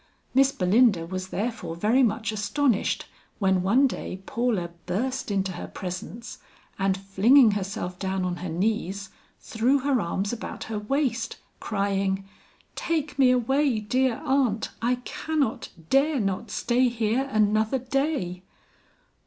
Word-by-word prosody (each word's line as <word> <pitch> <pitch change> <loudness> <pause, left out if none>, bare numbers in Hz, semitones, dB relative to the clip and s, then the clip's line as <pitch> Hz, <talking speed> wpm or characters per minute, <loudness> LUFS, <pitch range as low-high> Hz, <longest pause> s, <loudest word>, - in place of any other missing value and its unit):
Miss 270 +1 +5
Belinda 195 -3 +3
was 185 +2 -5
therefore 200 -5 -3
very 215 +9 +3
much 225 -2 +1
astonished 215 +3 0 0.3
when 190 -3 +2
one 230 +10 +4
day 190 -7 -4
Paula 220 -8 -1 0.2
burst 260 +6 -2
into 195 -2 0
her 175 - -6
presence, 205 +5 -7 0.4
and 195 0 +1
flinging 215 +6 +5
herself 190 -2 -4
down 190 -1 -1
on 175 -1 -2
her 180 0 -5
knees, 195 +2 -1 0.3
threw 240 +5 +1
her 270 -3 +2
arms 195 +5 -2
about 230 - -6
her 220 -1 -4
waist, 235 0 -1 0.2
crying, 195 -2 -1 0.5
"Take 310 -4 -2
me 260 -2 +6
away, 255 0 +2
dear 250 +3 0
aunt, 260 -5 +1
I 245 +2 +2
cannot, 305 -7 -2 0.2
dare 280 +1 +3
not 195 +1 -2
stay 245 +4 +2
here 235 +3 0
another 215 +2 +2
day." 260 - -1
220 Hz, 130 wpm, -26 LUFS, 195-255 Hz, 0.5 s, me